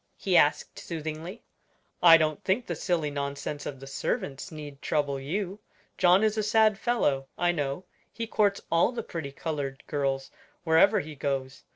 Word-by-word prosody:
he -, -, 0 dB
asked, -, -, +3 dB
soothingly. 160 Hz, +5 st, -6 dB, 0.6 s
"I 165 Hz, -1 st, +9 dB
don't 155 Hz, -2 st, -1 dB
think 210 Hz, +6 st, +1 dB
the -, -, -3 dB
silly 165 Hz, -5 st, -1 dB
nonsense 140 Hz, +1 st, -4 dB
of 135 Hz, -, -6 dB
the 135 Hz, -, -10 dB
servants 135 Hz, +3 st, -3 dB
need 145 Hz, -3 st, -9 dB
trouble 145 Hz, -3 st, 0 dB
you. 190 Hz, +8 st, -3 dB, 0.4 s
John 185 Hz, +2 st, +5 dB
is 215 Hz, 0 st, +2 dB
a -, -, +3 dB
sad 215 Hz, -1 st, +3 dB
fellow, 145 Hz, -, +1 dB
I 175 Hz, 0 st, +2 dB
know; 145 Hz, +1 st, -3 dB, 0.3 s
he 230 Hz, -, -4 dB
courts 205 Hz, -2 st, +1 dB
all 170 Hz, +7 st, +4 dB
the 235 Hz, -2 st, -4 dB
pretty 160 Hz, -8 st, -6 dB
colored 140 Hz, -2 st, -4 dB
girls 135 Hz, -2 st, -2 dB, 0.3 s
wherever 185 Hz, +5 st, +5 dB
he 155 Hz, -1 st, -8 dB
goes. 135 Hz, -1 st, -3 dB
160 Hz, 165 wpm, -28 LUFS, 140-195 Hz, 0.6 s, I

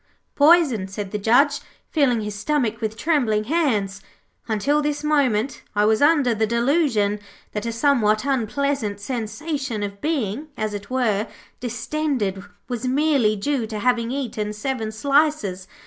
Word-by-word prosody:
'Poisoned,' 285 Hz, -, +4 dB
said 195 Hz, 0 st, -5 dB
the 210 Hz, -, -2 dB
Judge, 275 Hz, +7 st, +3 dB, 0.3 s
feeling 260 Hz, -7 st, +2 dB
his 210 Hz, 0 st, -4 dB
stomach 230 Hz, +1 st, -1 dB
with 220 Hz, 0 st, -3 dB
trembling 245 Hz, -10 st, +1 dB
hands. 215 Hz, -, 0 dB, 0.5 s
'Until 275 Hz, +7 st, +1 dB
this 295 Hz, 0 st, -2 dB
moment 275 Hz, -6 st, +1 dB
I 210 Hz, 0 st, +3 dB
was 220 Hz, +3 st, +3 dB
under 290 Hz, -5 st, +4 dB
the 220 Hz, 0 st, 0 dB
delusion 235 Hz, -4 st, +1 dB, 0.3 s
that 210 Hz, +2 st, -4 dB
a -, -, -1 dB
somewhat 230 Hz, -3 st, +2 dB
unpleasant 265 Hz, -4 st, -1 dB
sensation 250 Hz, +2 st, -3 dB
of 200 Hz, 0 st, -6 dB
being, 290 Hz, -3 st, -2 dB
as 215 Hz, -1 st, -2 dB
it 200 Hz, 0 st, -7 dB
were, 225 Hz, -5 st, 0 dB, 0.3 s
distended, 245 Hz, -4 st, -2 dB, 0.2 s
was 245 Hz, 0 st, -3 dB
merely 270 Hz, -5 st, +2 dB
due 235 Hz, +3 st, -1 dB
to 215 Hz, -1 st, -5 dB
having 235 Hz, +1 st, +1 dB
eaten 225 Hz, -6 st, -3 dB
seven 220 Hz, 0 st, -3 dB
slices. 275 Hz, -6 st, +1 dB
235 Hz, 140 wpm, -22 LUFS, 210-285 Hz, 0.5 s, Poisoned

